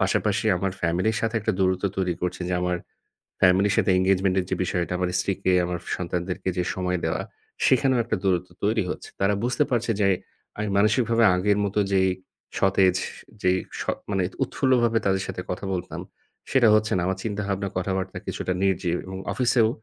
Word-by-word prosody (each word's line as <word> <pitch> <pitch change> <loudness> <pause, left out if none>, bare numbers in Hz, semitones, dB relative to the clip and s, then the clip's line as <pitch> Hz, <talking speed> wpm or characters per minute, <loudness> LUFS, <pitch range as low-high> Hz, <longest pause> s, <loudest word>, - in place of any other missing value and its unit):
পাশাপাশি 105 +3 +1
আমার 95 +1 -1
family 85 +5 +1
এর - - -3
সাথে 115 0 -1
একটা - - 0
দূরত্ব 95 0 +1
তৈরি 90 -2 0
করছে 90 +1 -2
যে, - - -1
আমার 90 0 0 0.6
family 95 +2 +5
এর - - +1
সাথে 95 - +3
engagement 95 0 +2
এর - - -4
যে, 95 - +2
বিষয়টা 90 0 -2
আমার 90 -1 0
স্ত্রীকে, 95 -1 0
আমার 90 0 -2 0.2
সন্তানদেরকে 90 +2 -3
যে, 90 - +2
সময় 90 -1 -1
দেওয়া, 80 - -1 0.4
সেখানেও 130 0 +3
একটা 115 - -1
দূরত্ব 90 -1 +1 0.2
তৈরি 110 +1 +2
হচ্ছে। - - -6
তারা 100 +1 +3
বুঝতে 130 +4 +2
পারছে 120 -1 0
যে, 100 - +4 0.5
আমি 105 0 -1
মানসিকভাবে 115 +2 +3
আগের 100 +3 +2
মতো 105 +1 0
যেই 95 -1 +3 0.5
সতেজ 95 -1 +4
স - - -5 0.3
যেই 90 0 +3 0.2
স - - -1 0.3
মানে 95 -2 +1 0.2
উৎফুল্লভাবে 120 -4 +2
তাদের 95 0 +2
সাথে 90 - -5
কথা 90 +2 -4
বলতাম, 90 - -5 0.5
সেটা 125 -4 +5
হচ্ছে 110 0 +2
না। - - +1
আমার 95 0 -1
চিন্তাভাবনা 100 -2 -2
কথাবার্তা 95 0 -2
কিছুটা 90 - -2
নির্জীব 90 -3 +1
এবং 95 0 -6
অফিসেও 120 -3 +3
95 Hz, 180 wpm, -25 LUFS, 90-105 Hz, 0.6 s, family